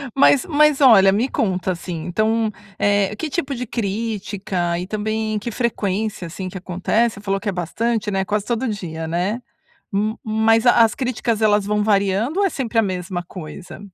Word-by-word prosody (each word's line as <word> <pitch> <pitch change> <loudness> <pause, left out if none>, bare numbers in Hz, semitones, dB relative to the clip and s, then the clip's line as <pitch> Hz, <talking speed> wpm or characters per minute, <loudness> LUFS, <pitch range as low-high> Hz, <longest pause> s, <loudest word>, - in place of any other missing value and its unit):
Mas 275 +1 +5
mas 300 -2 +3
olha, 205 -8 +7
me 230 +7 +1
conta 185 -5 0
assim, 170 -2 -5
então, 220 +4 +1 0.3
eh, 205 0 +2
que 320 +7 -4
tipo 285 -2 -2
de 250 +1 -4
crítica 200 -5 -2
e 180 - -4
também 215 +1 -2
que 210 - -5
frequência, 210 -5 -2
assim, 185 +3 -6
que 190 - -7
acontece? 190 +6 0
Você 200 - -11
falou 195 -1 -1
que 210 - -7
é - - 0
bastante, 210 +5 -1
né? 190 -1 0
Quase 210 +1 -1
todo 240 +2 -1
dia, 165 -7 -4
né? 180 +8 -1 0.5
Ma 215 +2 -1
mas 220 +1 +2
as 230 -2 +5
críticas 240 -3 -1
elas 210 -2 +3
vão 210 0 +1
variando 205 - +1
ou - - +4
é 390 - +2
sempre 240 -6 -3
a - - +6
mesma 180 -2 -3
coisa? 175 -1 -9
210 Hz, 180 wpm, -21 LUFS, 190-230 Hz, 0.5 s, olha